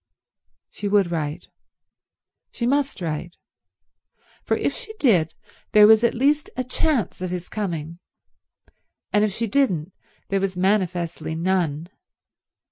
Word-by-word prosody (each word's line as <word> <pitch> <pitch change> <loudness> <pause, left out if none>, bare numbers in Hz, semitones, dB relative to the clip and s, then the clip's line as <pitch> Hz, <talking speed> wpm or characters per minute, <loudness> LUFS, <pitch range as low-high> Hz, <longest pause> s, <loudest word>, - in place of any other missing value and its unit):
She 205 - -5
would 200 -3 +3
write. 155 +1 -3 1.0
She 235 - -3
must 280 -3 0
write; 170 +1 -4 1.1
for - - 0
if - - 0
she 440 -3 -7
did 180 - +3 0.4
there 210 0 +8
was 220 +1 +6
at 235 - +2
least 290 +5 +2
a 255 - 0
chance 255 - -1
of 185 - -2
his 180 0 -4
coming, 170 -5 -4 1.1
and 210 0 +4
if 215 - +1
she 230 +4 -2
didn't 195 - 0 0.4
there 195 - +1
was 190 -2 -2
manifestly 180 -5 0
none. 170 -3 0
190 Hz, 125 wpm, -23 LUFS, 170-230 Hz, 1.1 s, there